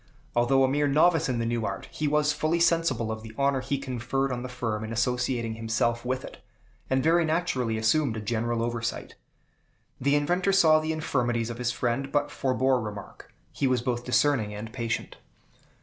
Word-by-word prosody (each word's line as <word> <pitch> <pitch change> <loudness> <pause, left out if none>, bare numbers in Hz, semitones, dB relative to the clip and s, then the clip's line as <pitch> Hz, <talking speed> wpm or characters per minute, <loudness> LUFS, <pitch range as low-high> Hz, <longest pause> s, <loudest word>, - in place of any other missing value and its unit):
Although 120 +3 +3
a - - +4
mere 145 +2 +1
novice 160 +2 +3
in 125 - 0
the 115 - -1
new 115 0 -1
art, 100 -1 -4
he 155 - -2
was 150 0 +2
fully 155 +3 0
sensible 165 -10 +2
of 110 0 -5
the 110 0 -11
honor 140 -1 +1
he 140 - -2
conferred 135 0 -2
on 120 -1 -3
the 130 - -6
firm 110 -3 -3
in 110 - -5
associating 120 0 0
himself 115 +1 -1
with 130 +1 -2
it, - - -12 0.5
and 130 0 +1
very 170 +2 +4
naturally 155 -9 0
assumed 115 +2 +1
a - - -2
general 115 +2 -1
oversight. 120 0 -3 0.9
The 140 +3 +2
inventor 175 +6 +1
saw 160 -5 +6
the 155 +1 -2
infirmities 120 -7 -1
of 120 - -8
his 120 -1 0
friend, 125 +3 -2
but 145 -1 0
forebore 130 -1 +1
remark. 105 -2 -8 0.2
He 135 - 0
was 125 -2 +1
both 120 -1 -1
discerning 125 -4 +1
and 110 +2 -7
patient. 115 -3 -3
125 Hz, 185 wpm, -27 LUFS, 115-145 Hz, 0.9 s, saw